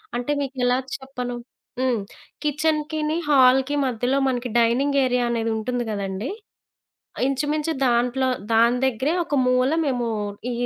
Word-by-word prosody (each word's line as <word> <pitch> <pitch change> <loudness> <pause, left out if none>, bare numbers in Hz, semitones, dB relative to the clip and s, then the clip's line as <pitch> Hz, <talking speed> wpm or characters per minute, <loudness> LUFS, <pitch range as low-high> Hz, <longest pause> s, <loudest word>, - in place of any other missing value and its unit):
అంటే 245 +4 -2
మీకెలా 255 -2 0 0.2
చెప్పను? 250 -2 -6 0.5
హ్మ్. 250 -4 +1 0.4
కిచెన్‌కిని, 305 +1 0
హాల్‌కి 265 0 +5
మధ్యలో 250 +2 0
మనకి 245 -1 -2
డైనింగ్ 275 +5 +2
ఏరియా 250 -1 +1
అనేది 230 -1 -1
ఉంటుంది 245 +2 -2
కదండీ! 200 - -3 1.0
ఇంచుమించు 295 +3 -1
దాంట్లో, 245 +2 +2 0.2
దాని 235 +2 +4
దగ్గరే 265 +5 0
ఒక 305 -3 -3
మూల 255 +1 +3
మేము 245 -4 -1 0.4
ఈ - - -2
255 Hz, 120 wpm, -23 LUFS, 245-280 Hz, 1.0 s, హాల్‌కి